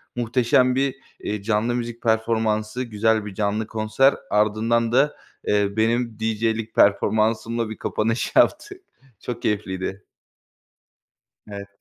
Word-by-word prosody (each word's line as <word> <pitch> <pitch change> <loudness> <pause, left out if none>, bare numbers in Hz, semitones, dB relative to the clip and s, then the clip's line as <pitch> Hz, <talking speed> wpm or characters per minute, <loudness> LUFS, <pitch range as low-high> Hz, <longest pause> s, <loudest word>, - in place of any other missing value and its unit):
muhteşem 125 +1 +2
bir, 135 0 0 0.2
eee, 105 -1 -4
canlı 115 +3 0
müzik 120 -1 -5
performansı, 110 +1 0
güzel 110 -1 0
bir 100 - -7
canlı 105 +2 -1
konser 110 +5 +2
ardından 110 +2 +1
da, 140 +4 +3 0.3
eee, 105 -1 +2
benim 115 0 0
DJ'lik 110 0 -1
performansımla 110 +2 +2
bir 110 - -7
kapanış 115 +2 -1
yaptık. 390 -2 +2 0.4
Çok 120 +1 -6
keyifliydi. 95 -1 -3 1.4
Evet. 100 -1 -8
110 Hz, 110 wpm, -23 LUFS, 105-120 Hz, 1.4 s, da